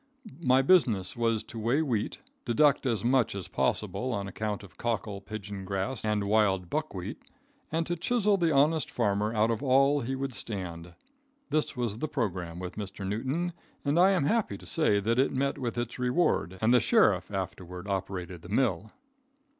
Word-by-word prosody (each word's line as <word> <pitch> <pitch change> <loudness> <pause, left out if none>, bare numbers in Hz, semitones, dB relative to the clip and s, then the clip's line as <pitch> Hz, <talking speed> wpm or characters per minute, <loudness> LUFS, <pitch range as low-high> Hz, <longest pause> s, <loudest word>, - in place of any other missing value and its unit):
My 130 0 +4
business 120 - +3
was 115 -2 +1
to 115 +1 -8
weigh 120 +8 +2
wheat, 115 -8 -2 0.2
deduct 140 +3 +3
as 115 -3 0
much 125 -4 +2
as 95 -3 -5
possible 130 +1 -1
on 100 -2 -3
account 105 +1 -3
of 100 - -14
cockle, 110 -4 -3
pigeon 100 -1 -7
grass 100 +6 -3
and 105 -1 0
wild 100 -4 +2
buckwheat, 150 - -3 0.5
and 165 +1 0
to 175 - -1
chisel 210 +3 +2
the 170 -4 +2
honest 150 +2 +3
farmer 105 -2 0
out 110 0 +2
of 115 - -2
all 140 +2 +4
he 130 +2 -2
would 135 0 -3
stand. 90 -6 -5 0.6
This 155 -3 0
was 115 -3 -2
the 155 - -1
programme 90 - -3
with 90 +2 -6
Mr. 100 -1 -5
Newton; 135 - -2 0.3
but 145 +1 +1
I 185 +2 +7
am 180 - +2
happy 225 +7 +1
to - - -14
say 155 - +2
that 115 +4 +1
it 135 0 +2
met 140 +1 0
with 120 -2 -3
its 120 +1 -3
reward, 125 - +1
and 115 +3 +5
the 125 - +7
sheriff - - +3
afterward 90 +1 -5
operated 95 -3 -4
the 85 - -12
mill. 110 -3 +1
115 Hz, 180 wpm, -29 LUFS, 100-135 Hz, 0.6 s, I